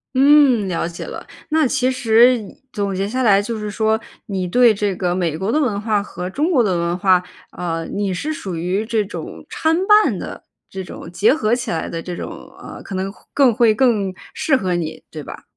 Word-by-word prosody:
嗯， 270 -5 +5
了 170 -2 -1
解 170 - -7
了。 - - -8 0.2
那 315 0 +3
其 255 0 +1
实 245 0 +4 0.4
总 200 -2 -2
结 195 +1 -1
下 255 +5 -1
来 200 -4 +5
就 225 +2 -4
是 210 -1 -4
说， 220 +1 +1 0.3
你 190 -3 -3
对 235 +5 +5
这 205 -1 -1
个 180 -1 0
美 170 -4 -1
国 195 +4 -3
的 305 - +3
文 220 -8 0
化 210 -1 0
和 180 -2 -6
中 300 - 0
国 275 -8 +4
的 190 -6 +1
文 170 +1 -1
化， 185 -1 +3 0.3
啊， 165 -2 -4
你 200 -2 -2
是 300 - -3
属 190 - -5
于 185 +6 -1
这 220 -2 0
种 200 - -8
参半 385 +7 +3
的 - - -8 0.3
这 190 0 -6
种 180 - -9
结 200 +9 +4
合 235 -6 +1
起 240 -1 -4
来 160 - -2
的， 165 - -5
这 175 0 -6
种， - - -5 0.3
呃， - - -10
可 - - -9
能 190 +1 -2
会 - - -21
更 270 -4 +4
会 230 -1 +4
更 215 -5 +1 0.2
适 275 -4 +2
合 185 -6 -1
你， 160 -2 -4
对 155 -2 -8
吧？ - - -10
205 Hz, 230 characters per minute, -19 LUFS, 185-250 Hz, 0.4 s, 嗯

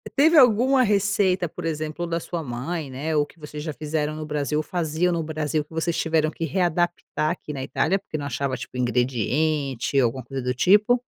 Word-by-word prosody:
Teve 310 +3 +5
alguma 255 +1 +6
receita, 200 -4 +2
por 175 - -7
exemplo, 155 +1 -3
da 165 0 -1
sua 170 -2 -4
mãe 140 +4 -4
né 140 +5 -3
ou 145 -1 +3
que 155 - -21
vocês 150 0 -7
já 155 -1 -4
fizeram 155 0 -2
no 155 0 -5
Brasil 150 0 -1
ou - - -1
faziam 170 +2 0
no 170 -1 0
Brasil 155 -1 -2
que 160 - -18
vocês 165 +1 -1
tiveram 160 -1 +1
que 165 - -4
readaptar 175 -1 0
aqui 175 - -6
na 135 - -5
Itália 165 +7 +1
porque 175 -5 -6
não 145 - -5
achava 140 0 -2
tipo - - -8
ingrediente 130 +3 0
ou - - +4
alguma 125 +2 -2
coisa 135 +2 -5
do 125 0 -1
tipo? 210 - +4
155 Hz, 205 wpm, -24 LUFS, 145-175 Hz, -, alguma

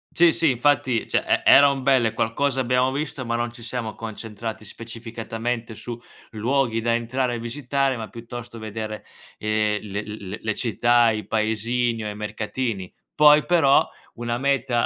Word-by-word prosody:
Sì, 170 -1 +6
sì, 165 -3 +2
infatti 125 -2 +1
cioè - - +1
e - - +2
eran 140 -1 +6
belle, 130 -4 +3
qualcosa 135 +4 0
abbiamo 125 +1 +2
visto, 140 -2 -4
ma 115 0 -1
non 120 0 -1
ci 120 0 -12
siamo 115 -2 -4
concentrati 110 0 -6
specificatamente 115 +1 -5
su 120 +2 -7 0.3
luoghi 115 +1 0
da 115 +1 +1
entrare 120 +2 -1
e 120 - -3
visitare, 135 +2 -1
ma 110 -1 -5
piuttosto 120 0 -9
vedere, 110 0 -5 0.4
ehm, 105 -1 0
le 100 0 -4
le 105 -1 -7
le 110 -1 -2
città, 120 +1 +3
i 110 -2 -2
paesini 115 +2 0
o 105 - -3
i 105 - -6
mercatini. 105 -1 -4 0.2
Poi, 150 0 +7
però, 165 -6 +4 0.3
una 120 0 -2
meta, 130 -3 +1
115 Hz, 160 wpm, -23 LUFS, 110-130 Hz, 0.4 s, Poi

